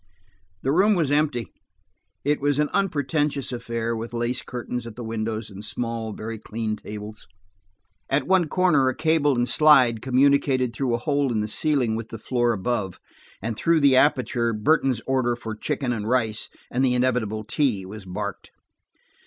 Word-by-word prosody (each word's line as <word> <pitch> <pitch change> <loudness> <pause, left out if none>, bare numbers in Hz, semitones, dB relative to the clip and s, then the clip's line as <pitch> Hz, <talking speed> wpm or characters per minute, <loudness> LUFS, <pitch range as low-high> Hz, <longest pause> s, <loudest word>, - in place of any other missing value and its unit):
The 135 - +1
room 200 +7 +4
was 160 -6 +1
empty; 145 -6 +1 0.8
it 145 0 +1
was 145 0 +1
an 150 0 +1
unpretentious 150 -7 0
affair, 115 -1 -3
with 115 +1 -6
lace 120 +1 -1
curtains 125 -1 -5
at 115 - -9
the 120 - -7
windows 110 -1 -3
and 100 +1 -9
small, 115 +1 -3
very 110 +1 -6
clean 110 0 -3
tables. 105 0 -9 0.8
At 135 0 +1
one 185 -3 +3
corner 155 -6 +3
a 130 - -3
cable 155 -3 +2
and 120 0 +1
slide 125 -4 +5
communicated 130 -1 +2
through 125 -2 0
a - - 0
hole 140 0 0
in 110 -2 0
the 105 - -2
ceiling 125 -1 0
with 115 0 -5
the 115 - -7
floor 120 +2 0
above, 105 -3 -2 0.4
and 115 0 -2
through 165 +6 +2
the 140 -2 +5
aperture, 125 -4 +2
Burton's 125 +1 +2
order 130 -2 +1
for 115 -2 -6
chicken 135 +1 -2
and 110 -1 -3
rice, 115 -4 0 0.2
and 125 +2 +1
the 125 -2 +3
inevitable 120 -4 0
tea, 110 -4 0
was 105 +2 -9
barked. 100 +2 -6
120 Hz, 170 wpm, -24 LUFS, 110-140 Hz, 0.8 s, slide